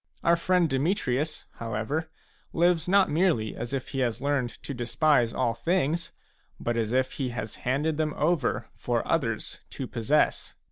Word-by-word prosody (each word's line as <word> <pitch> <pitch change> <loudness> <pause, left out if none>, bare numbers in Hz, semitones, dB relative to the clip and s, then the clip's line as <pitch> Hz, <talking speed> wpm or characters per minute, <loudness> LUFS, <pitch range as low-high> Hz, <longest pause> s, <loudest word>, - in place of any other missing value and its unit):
Our 170 - +5
friend 180 0 +2
Demetrius, 145 0 0
however, 115 +8 -2 0.4
lives 170 -1 +3
not 195 +1 +4
merely 155 - +2
as 120 - -5
if 135 -2 -3
he 135 - -3
has 120 -3 0
learned 140 -3 0
to 140 - -4
despise 120 +1 +2
all 115 - 0
things, 170 +5 0 0.5
but 120 - -1
as 115 -2 0
if 130 +1 +2
he 135 -3 -2
has 110 -2 -5
handed 145 +5 0
them 155 -1 0
over 155 -3 +1
for - - -1
others - - -1
to 135 - -5
possess. 125 +6 +1
140 Hz, 155 wpm, -27 LUFS, 120-160 Hz, 0.5 s, Our